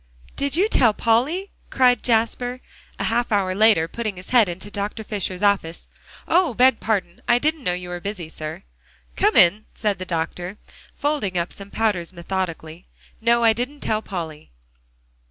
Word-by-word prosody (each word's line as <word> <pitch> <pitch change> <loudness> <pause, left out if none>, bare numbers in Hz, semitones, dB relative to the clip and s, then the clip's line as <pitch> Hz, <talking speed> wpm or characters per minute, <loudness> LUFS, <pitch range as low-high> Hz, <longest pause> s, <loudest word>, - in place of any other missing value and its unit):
"Did 280 +1 0
you 380 +5 +3
tell 230 - +3
Polly?" 280 - +1 0.2
cried 250 -2 +3
Jasper, 245 +2 0 0.4
a - - -3
half 235 +1 0
hour 195 -3 +1
later, 210 -5 +4
putting 215 0 -4
his 180 - -11
head 235 -6 +5
into 190 +4 -6
Dr. 205 +2 -4
Fisher's 200 -2 -3
office. 195 -5 +1 0.4
"Oh! 335 -7 +3
beg 255 0 +5
pardon; 190 -5 -2
I 240 - +5
didn't 310 +2 -1
know 180 - 0
you 180 0 -7
were 175 0 -4
busy, 195 -3 -5
sir." 155 -1 -7 0.5
"Come - - +2
in," 195 +5 +5
said 205 -4 -1
the 185 - -5
doctor, 175 +3 -3 0.4
folding 280 -11 -1
up 170 0 -2
some 200 0 -9
powders 200 -6 -1
methodically. 170 -2 -5 0.3
"No, 235 +1 +3
I 225 -1 +6
didn't 250 +6 -4
tell 215 -1 0
Polly." 165 -7 -6
210 Hz, 165 wpm, -22 LUFS, 180-240 Hz, 0.5 s, I